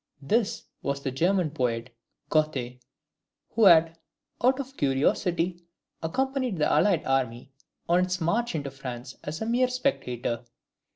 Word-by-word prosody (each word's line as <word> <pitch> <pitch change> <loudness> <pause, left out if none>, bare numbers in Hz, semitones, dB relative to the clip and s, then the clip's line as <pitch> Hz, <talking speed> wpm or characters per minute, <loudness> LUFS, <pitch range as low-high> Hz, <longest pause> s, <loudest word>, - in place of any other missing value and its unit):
This 215 - +1 0.2
was 140 0 -2
the 135 - -1
German 175 +4 +1
poet, 125 -4 -2 0.4
Goethe, 135 -6 0 0.7
who 225 -1 +3
had, 165 -2 +6 0.4
out 260 +2 +4
of 270 0 -6
curiosity, 170 - +1 0.4
accompanied 260 +5 -1
the 150 - +2
allied 185 -6 +3
army 130 -1 -1 0.4
on 175 +1 +4
its 185 0 0
march 220 +7 0
into 140 -3 -3
France 130 -1 -7
as 155 +7 -4
a - - -3
mere 245 +3 +2
spectator. 125 - -2
160 Hz, 130 wpm, -27 LUFS, 135-210 Hz, 0.7 s, had